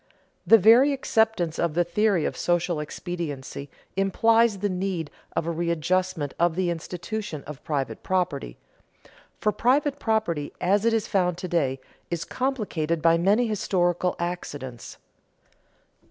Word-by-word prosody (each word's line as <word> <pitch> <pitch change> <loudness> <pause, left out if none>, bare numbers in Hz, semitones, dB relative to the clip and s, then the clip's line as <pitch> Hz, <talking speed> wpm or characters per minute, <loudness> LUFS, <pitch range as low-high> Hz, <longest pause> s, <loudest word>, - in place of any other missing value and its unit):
The 225 - +9
very 235 +8 +6
acceptance 220 - +1
of 170 -3 0
the 175 - +3
theory 185 -1 +1
of - - -2
social 175 -2 0
expediency 150 -3 -5 0.3
implies 225 +3 +3
the 205 +2 -1
need 185 -4 -3 0.2
of - - 0
a 170 - -1
readjustment 170 -1 -1
of 170 -1 +2
the 180 -1 0
institution 175 0 -5
of 150 -2 -9
private 140 -3 -3
property; 175 - -2 0.8
for 210 - +1
private 280 +5 +1
property, 215 - -1
as 200 +4 +2
it 230 - +3
is 220 -2 0
found 180 -5 +1
to 185 - -5
day, 140 -7 0 0.3
is 170 -2 -3
complicated 205 - -1
by 165 +1 +4
many 205 +7 +3
historical 180 -4 0
accidents. 145 -8 -5
175 Hz, 135 wpm, -25 LUFS, 165-210 Hz, 0.8 s, The